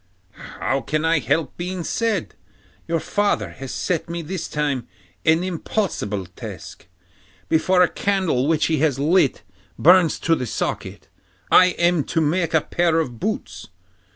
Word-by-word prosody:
'How 135 +5 -3
can 155 +6 -1
I 165 -1 +3
help 160 +2 -1
being 180 0 -4
sad? 220 -1 -1 0.5
Your 165 0 0
father 155 - 0
has 130 +9 -8
set 170 -2 -2
me 170 0 -4
this 170 +2 -4
time 145 -5 -2 0.4
an 160 +2 +4
impossible 170 - -2
task. 90 -1 -10 0.6
Before 180 +3 +4
a - - +4
candle 185 -11 0
which 160 -1 +2
he 160 -3 +1
has 145 -3 +2
lit 150 +1 +2 0.3
burns 175 -1 +5
to 165 - +2
the 130 -6 -1
socket, - - -4 0.4
I 180 0 +6
am 170 -3 +2
to 165 - -1
make 165 +2 +1
a 160 - +4
pair 170 0 +1
of 125 -8 -3
boots. 215 - -4
165 Hz, 150 wpm, -22 LUFS, 145-180 Hz, 0.6 s, I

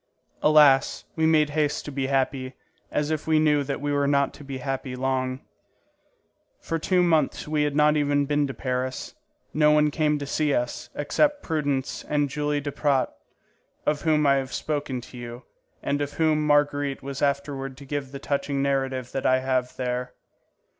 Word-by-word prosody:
Alas, 150 -3 +5
we 160 -1 +2
made 155 -2 +3
haste 150 -1 0
to 145 - -5
be 135 -1 -2
happy, 135 -1 -1 0.4
as 150 +1 0
if 155 0 -2
we 160 -1 +4
knew 150 -2 +3
that 140 0 -3
we 145 +1 -2
were 140 0 +2
not 140 0 +2
to - - -12
be 135 -1 -6
happy 130 -1 -4
long. 130 0 -1 1.2
For 165 - -3
two 180 +2 +2
months 160 -5 +1
we 150 0 0
had 145 -1 0
not 150 0 +4
even 145 -1 +2
been 145 0 +1
to 135 - -5
Paris. 130 0 -3 0.4
No 150 0 +4
one 150 0 +4
came 150 0 +1
to 145 - -5
see 145 +1 +1
us, 120 0 -3
except 290 - +1
Prudence 145 -4 -2
and 145 -2 0
Julie 145 0 -1
Duprat, 145 -1 0 0.7
of 150 -1 +1
whom 155 -2 +2
I 140 -1 +5
have 135 -1 -3
spoken 145 -4 -2
to 125 +1 -11
you, 120 +1 -8 0.4
and 145 - 0
to 145 - 0
whom 155 0 +1
Marguerite 145 -1 +1
was 135 0 -5
afterward 140 -1 -1
to 140 - -11
give 135 -1 -4
the 140 - -6
touching 140 0 -2
narrative 135 -2 -1
that 135 - -1
I 130 0 +3
have 130 -1 -1
there. 125 0 -3
145 Hz, 180 wpm, -25 LUFS, 135-150 Hz, 1.2 s, Alas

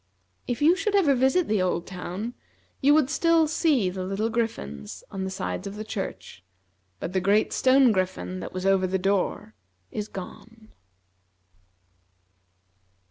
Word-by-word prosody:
If 245 +3 -2
you 330 +4 +6
should 405 +2 -1
ever 335 -9 +4
visit 265 +7 +2
the 210 -3 +1
old 180 -2 0
town, 190 +5 -5 0.5
you 280 - +5
would 305 -2 +3
still 330 0 +3
see 300 - +2
the 185 0 -4
little 200 +4 -2
griffins 75 - -4
on 190 -1 -3
the - - -3
sides 190 0 -4
of 200 - -7
the 215 - -5
church; 195 - -6 0.6
but 175 - -5
the 190 - +1
great 205 +3 +2
stone 260 -1 +5
griffin 185 -1 -2
that - - -6
was 185 0 -5
over 195 -1 +3
the 190 +1 0
door 190 - -1 0.4
is 210 0 -4
gone. 220 +4 -10
210 Hz, 150 wpm, -26 LUFS, 185-260 Hz, 0.6 s, you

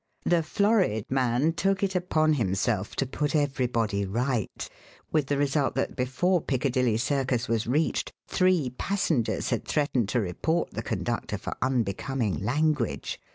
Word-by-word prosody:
The 175 -1 +3
florid 190 - +2
man 130 +4 +2
took 195 +3 0
it 195 -1 +1
upon 160 -4 +2
himself 100 -3 0
to 135 - 0
put 145 +3 -2
everybody 125 -8 0
right, 115 +3 -2 0.4
with 150 -4 +1
the 145 - 0
result 140 0 +1
that - - -1
before 145 +8 +1
Piccadilly 125 -4 +1
Circus 130 -1 0
was 115 -1 0
reached 150 +6 0 0.2
three 180 -8 +2
passengers 155 - 0
had 120 - 0
threatened 135 -8 +1
to 120 - +1
report 150 - -1
the - - -4
conductor - - -2
for - - -5
unbecoming 120 - 0
language. 145 +1 0
135 Hz, 140 wpm, -27 LUFS, 115-155 Hz, 0.4 s, The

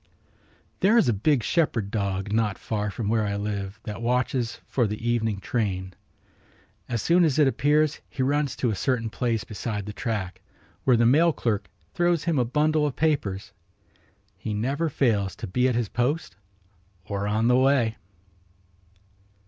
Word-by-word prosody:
There 210 +5 +4
is 230 - +4
a 120 - +3
big 120 +5 +2
shepherd 115 - 0
dog 100 -1 -2
not 110 -3 +1
far 105 -1 -2
from 100 +2 -4
where 110 0 +2
I 100 -1 -1
live 100 -1 -4
that 105 -1 -6
watches 125 0 0
for 120 -4 +1
the 105 +3 -4
evening 110 -4 0
train. 95 -3 -2 1.0
As 120 -3 -2
soon 175 +1 +4
as 155 -4 +2
it 150 -3 +5
appears 150 +2 +2
he 130 - -2
runs 145 +1 0
to 120 - 0
a - - -2
certain 115 +2 -1
place 115 -4 -1
beside 105 -1 -4
the 105 - -6
track, 105 -6 -3 0.4
where 125 -3 +5
the 120 - +3
mail 155 +8 +5
clerk 105 -8 -2 0.2
throws 175 -2 +1
him 165 -5 +1
a 125 - +2
bundle 150 +4 +2
of 140 - -4
papers. 105 -11 -1 0.9
He 105 - -3
never 140 +9 -1
fails 110 -9 +1
to - - -6
be 125 +6 +1
at 125 - 0
his 115 -4 -1
post 125 - -1 0.7
or 100 0 -3
on 110 +2 +1
the 125 0 +5
way. 130 -4 +3
115 Hz, 165 wpm, -25 LUFS, 105-140 Hz, 1.0 s, it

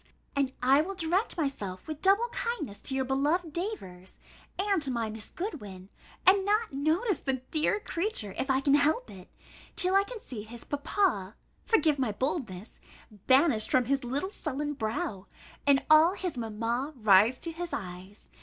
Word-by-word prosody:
and 275 -2 +1
I 270 +3 +5
will 390 +5 -4
direct 360 +5 0
myself 210 - -3
with 310 -1 -6
double 400 +5 +4
kindness 415 - -4
to 265 - -3
your 265 -1 0
beloved 295 +5 0
Davers, 190 - -6 0.4
and 390 -2 +1
to 280 - 0
my 230 -3 -2
Miss 220 -1 -4
Goodwin, 205 - -7 0.4
and 385 +1 +6
not 420 -1 +1
notice 320 - 0
the 260 -2 -2
dear 315 +6 +2
creature, 340 - -3
if 270 - -2
I 265 0 +3
can 275 0 +3
help 305 +12 +2
it, 185 -1 -12 0.5
till 365 0 +1
I 390 0 +5
can 480 +4 -8
see 250 - -7
his 230 +2 -9
papa 285 - 0 0.3
(forgive 310 - +3
my 255 -5 +1
boldness) 225 - -3 0.5
banished 260 -4 +4
from 255 -1 +3
his 275 +2 0
little 280 +10 -2
sullen 295 -4 -3
brow, 215 -5 -3 0.4
and 275 -1 +4
all 315 +4 +6
his 365 -5 -3
mamma 235 +5 -2
rise 215 +1 +5
to 335 - -5
his 345 +1 -5
eyes. 185 0 -7
280 Hz, 165 wpm, -29 LUFS, 225-350 Hz, 0.5 s, and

